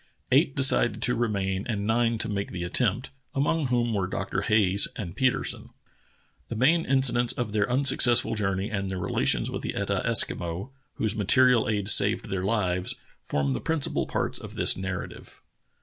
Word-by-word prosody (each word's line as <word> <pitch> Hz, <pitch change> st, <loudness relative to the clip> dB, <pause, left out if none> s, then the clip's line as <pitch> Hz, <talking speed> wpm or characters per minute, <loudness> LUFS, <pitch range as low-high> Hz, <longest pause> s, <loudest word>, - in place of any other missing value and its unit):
Eight 140 Hz, +1 st, +3 dB
decided 120 Hz, -5 st, +2 dB
to 125 Hz, -, +2 dB
remain 100 Hz, -5 st, -1 dB
and 100 Hz, -4 st, -2 dB
nine 115 Hz, +1 st, +1 dB
to 110 Hz, -, -2 dB
make 100 Hz, -2 st, -3 dB
the 90 Hz, -2 st, -5 dB
attempt, 120 Hz, +7 st, -1 dB, 0.2 s
among 145 Hz, +2 st, +1 dB
whom 120 Hz, -2 st, 0 dB
were 95 Hz, -3 st, -1 dB
Dr. 95 Hz, 0 st, -3 dB
Hayes 100 Hz, -2 st, +2 dB
and 85 Hz, -5 st, -6 dB
Petersen. 130 Hz, -1 st, 0 dB, 0.8 s
The 115 Hz, -, -4 dB
main 160 Hz, +9 st, +3 dB
incidents 125 Hz, -3 st, +2 dB
of 115 Hz, -4 st, -4 dB
their 105 Hz, 0 st, +1 dB
unsuccessful 125 Hz, -3 st, +3 dB
journey 95 Hz, -1 st, -2 dB
and 100 Hz, -2 st, -2 dB
their 95 Hz, -, -4 dB
relations 90 Hz, -, 0 dB
with -, -, -4 dB
the -, -, -4 dB
Etah -, -, -1 dB
Eskimo, 85 Hz, +8 st, 0 dB, 0.2 s
whose 110 Hz, -1 st, -1 dB
material 125 Hz, +3 st, +3 dB
aid 105 Hz, -2 st, -1 dB
saved 105 Hz, +1 st, +3 dB
their 95 Hz, -1 st, -2 dB
lives, 95 Hz, -3 st, -1 dB, 0.3 s
form 70 Hz, -1 st, -1 dB
the 65 Hz, -, -2 dB
principal 160 Hz, -3 st, 0 dB
parts -, -, -2 dB
of -, -, -10 dB
this -, -, +4 dB
narrative. 95 Hz, -1 st, -7 dB
110 Hz, 165 wpm, -26 LUFS, 95-125 Hz, 0.8 s, this